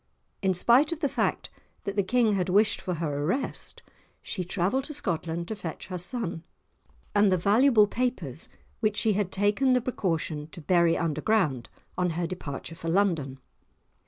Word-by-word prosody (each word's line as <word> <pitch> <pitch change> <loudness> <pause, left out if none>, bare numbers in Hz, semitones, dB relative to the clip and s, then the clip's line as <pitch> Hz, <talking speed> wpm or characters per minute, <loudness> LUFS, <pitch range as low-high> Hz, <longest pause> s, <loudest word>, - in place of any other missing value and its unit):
In 190 -1 +2
spite 245 - +4
of 335 - -3
the 300 - +1
fact - - -1 0.3
that 200 - -4
the 200 - +3
King 225 +2 +2
had 185 -2 0
wished 205 +3 +3
for 185 -2 -2
her 150 -3 -2
arrest, 195 - -2 0.4
she 185 - -3
travelled 195 +9 0
to 300 - -6
Scotland 170 - -3
to 220 - -2
fetch 180 -3 -7
her 180 -1 -4
son, 180 -3 -3 0.7
and 205 -1 +4
the 185 - +3
valuable 215 +5 +5
papers 205 - -3 0.3
which 215 -2 0
she 220 - +3
had 200 -2 -1
taken 205 +7 +2
the 250 - +4
precaution 165 -10 -2
to - - -9
bury 170 0 +3
underground 165 - 0 0.3
on 180 0 +2
her 175 - 0
departure 165 -3 -6
for 165 0 -5
London. 165 -8 +1
190 Hz, 165 wpm, -27 LUFS, 165-220 Hz, 0.7 s, valuable